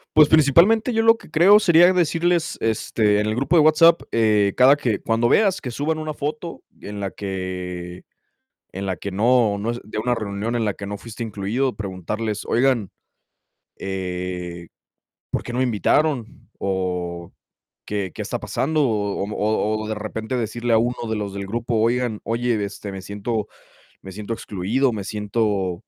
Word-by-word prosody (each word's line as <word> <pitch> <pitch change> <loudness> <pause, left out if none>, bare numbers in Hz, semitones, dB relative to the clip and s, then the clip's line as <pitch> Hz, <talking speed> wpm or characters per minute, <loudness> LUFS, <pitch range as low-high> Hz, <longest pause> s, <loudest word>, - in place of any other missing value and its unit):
Pues 150 -1 +7
principalmente 170 - +4
yo 225 0 +2
lo 225 0 +6
que - - -16
creo, 190 +7 +6
sería 175 -2 +6
decirles, 170 -1 +1
este, 110 -1 +1
en 105 - 0
el 110 0 -1
grupo 140 +8 +2
de - - +7
WhatsApp, 165 +2 +5
eh, 105 -3 +3
cada 130 +3 +6
que 115 -8 -1
cuando 115 +1 +1
veas 195 - +3
que 125 - -6
suban 150 +6 -1
una 155 -1 -4
foto 155 +3 -5 0.2
en 105 0 -7
la 100 -1 -3
que 90 -2 -6 0.7
en 95 +1 -5
la 95 -1 -2
que 100 +4 -6
no 110 0 +3
no 110 +3 -1
es 120 0 -4
de 105 - -6
una 120 +2 0
reunión 110 +2 -3
en 115 - 0
la 105 -2 -1
que 100 - -8
no 100 +1 -5
fuiste 115 +3 -8
incluido, 115 +5 -2
preguntarles: 105 +2 -4
"Oigan, 120 -5 +1 0.9
eh, 90 -2 -5 0.6
¿por - - -1
qué 120 - -7
no 125 - 0
me - - +3
invitaron?". 125 - 0
O: 90 -3 -3 0.5
"¿Qué 100 -4 -3
qué - - -8
está - - -3
pasando?", 155 +3 -1
o 105 -4 -1
o, - - -2
mm, 105 - -6
o 110 0 0
o - - -6
de 110 - -1
repente, 110 +3 -4
decirle 120 0 -1
a - - +5
uno 120 0 -1
de 110 - -1
los 105 -2 -4
del 100 0 -5
grupo: 115 +3 -2
"Oigan 115 0 0
Oye, 115 -2 0
este, 100 0 -8
me 95 - -6
siento 105 +3 -3 0.5
me 95 - -10
siento 105 +3 -7
excluido, 115 +6 -1
me 105 -2 -4
siento" 105 -2 -1
110 Hz, 180 wpm, -22 LUFS, 100-130 Hz, 0.9 s, Pues